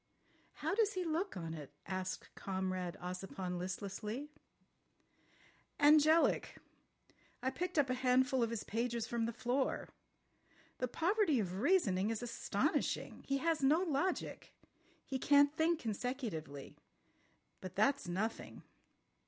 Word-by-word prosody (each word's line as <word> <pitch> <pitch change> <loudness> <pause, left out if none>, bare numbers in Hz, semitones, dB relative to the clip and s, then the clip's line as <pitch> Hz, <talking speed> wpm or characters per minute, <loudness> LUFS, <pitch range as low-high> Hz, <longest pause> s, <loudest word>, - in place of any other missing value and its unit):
"How - - -2
does 425 0 +2
he 370 - -1
look 335 - -1
on 165 -2 -4
it?" 150 -4 -8
asked 185 0 -4
Comrade 185 -2 -3
Ossipon 180 0 -4
listlessly. 210 +9 -4 1.5
"Angelic.... 310 +2 +5 0.9
I 260 - +1
picked 360 +5 -3
up 290 -2 +4
a 255 - 0
handful 255 +1 +3
of 230 - +2
his 230 -2 -3
pages 235 +1 -1
from 230 -1 -1
the - - -1
floor. 250 +3 -1 0.9
The 250 - 0
poverty 335 - +2
of 185 -2 -2
reasoning 210 - +3
is 225 +1 -2
astonishing. 235 -1 -1
He 275 - +1
has 325 -2 +2
no 295 +5 +4
logic. 340 +1 -2 0.5
He 265 - -3
can't 285 +2 +5
think 320 +1 +2
consecutively. 210 - -4 0.8
But 185 - -8
that's 275 +3 +2
nothing. 205 +6 -3
245 Hz, 120 wpm, -36 LUFS, 190-295 Hz, 1.5 s, Angelic